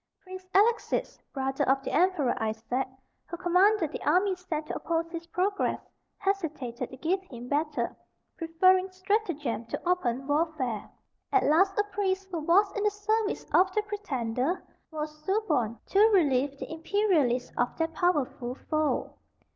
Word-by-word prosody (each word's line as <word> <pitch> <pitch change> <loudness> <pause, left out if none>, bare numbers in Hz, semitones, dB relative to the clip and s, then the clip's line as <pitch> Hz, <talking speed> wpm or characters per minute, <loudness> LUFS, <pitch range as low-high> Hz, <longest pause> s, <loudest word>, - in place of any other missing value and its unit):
Prince 370 -1 -10
Alexis, 450 +4 +2
brother 270 0 -1
of 270 0 +3
the - - -3
Emperor 340 -7 +2
Isaac, 225 +4 -1 0.4
who 345 - -6
commanded 360 0 +3
the - - -6
army 370 +5 +3
sent 335 -4 -4
to - - -5
oppose 330 0 -2
his 335 -1 -6
progress, 375 +4 0 0.4
hesitated 305 -11 -2
to 260 - -10
give 355 +7 0
him 245 -10 -10
battle, 300 +2 -1 0.4
preferring 370 +3 +3
stratagem 370 - -1
to - - -3
open 270 -8 0
warfare. 290 -7 -1 0.4
At 400 - +4
last 380 +7 +3
a 415 - +4
priest, 390 -1 -2
who 340 - -2
was 365 +6 +4
in 410 - -1
the 420 - +4
service 425 +1 -1
of 375 +1 +5
the 425 - +2
pretender, 295 - -2 0.3
was 305 -1 -6
suborned 305 - 0
to 390 - +3
relieve 280 -7 +2
the 315 - -6
imperialists 320 - +1
of 245 - -1
their 325 0 0
powerful 285 -7 0
foe. 310 +1 -1
330 Hz, 145 wpm, -28 LUFS, 275-380 Hz, 0.4 s, of